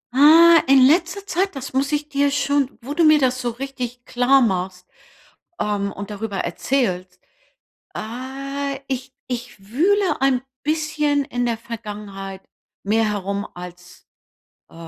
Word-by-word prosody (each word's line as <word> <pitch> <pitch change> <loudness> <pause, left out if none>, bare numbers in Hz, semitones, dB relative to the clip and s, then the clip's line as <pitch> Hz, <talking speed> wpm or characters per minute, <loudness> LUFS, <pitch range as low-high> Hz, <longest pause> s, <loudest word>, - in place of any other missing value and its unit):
Ah, 325 +4 +8
in 270 -1 +6
letzter 350 +6 +2
Zeit, 385 -2 -1
das 270 -1 -7
muss 275 +2 0
ich 295 0 -1
dir 285 -1 +1
schon 280 -1 0
wo 280 +4 -5
du 335 - +2
mir 310 -1 +7
das 255 -2 +1
so 245 - -1
richtig 245 -1 -6
klar 250 +2 +3
machst, 185 -4 -1 0.7
ähm, 200 -1 -1
und 200 +1 -7
darüber 205 -1 -4
erzählst 185 -3 -1 0.8
äh, 275 +4 -5
ich 265 0 -4
ich 245 -4 -6
wühle 380 - +2
ein 265 -2 +2 0.2
bisschen 300 -2 0
in 245 -3 -2
der 230 -2 -1
Vergangenheit 205 -4 -8 0.4
mehr 220 +2 +2
herum 200 0 -3
als, 180 0 -11 0.6
äh, - - -20
255 Hz, 135 wpm, -21 LUFS, 210-285 Hz, 0.8 s, Ah